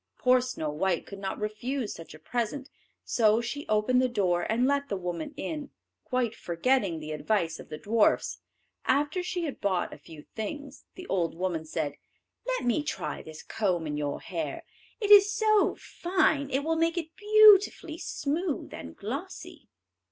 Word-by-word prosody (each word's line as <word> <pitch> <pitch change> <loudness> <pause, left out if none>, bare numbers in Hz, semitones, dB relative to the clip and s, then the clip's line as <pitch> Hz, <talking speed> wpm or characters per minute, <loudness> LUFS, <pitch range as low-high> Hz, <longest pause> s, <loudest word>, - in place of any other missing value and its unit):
Poor 255 0 +4
Snow 245 -12 -3
white 170 +3 0
could 200 - -9
not 195 -1 -4
refuse 220 +3 -3
such 165 -2 -11
a - - -14
present, 245 - -3 0.3
so 220 -1 +3
she 280 +5 -4
opened 215 +4 +3
the 255 - +2
door 185 -5 +1
and 240 +3 +2
let 280 +1 +1
the 200 - -1
woman 180 - -4
in, 295 -1 -4 0.4
quite 250 -3 0
forgetting 180 0 0
the 155 0 -7
advice 165 +1 -1
of - - -11
the 155 - -6
dwarfs. 215 +6 +2 0.5
After 290 +6 +1
she 355 -1 -3
had 295 -5 -5
bought 190 -3 0
a - - -11
few 155 -3 -12
things, 275 +6 -7
the 365 0 -9
old 175 - -1
woman 170 -2 -2
said, 155 -2 -3 0.5
"Let - - -1
me 245 +5 +2
try 295 - -4
this 155 0 -10
comb 180 -6 -1
in 150 -1 -3
your 145 -1 -3
hair; 160 -5 -4 0.3
it 415 -3 0
is 410 0 +9
so 430 0 +3
fine 345 -6 0
it 270 +1 0
will 325 +1 0
make 330 +1 +1
it 330 -1 -4
beautifully 415 -6 +5
smooth 305 +2 -2
and 80 - -8
glossy." - - -7
240 Hz, 170 wpm, -28 LUFS, -, 0.5 s, is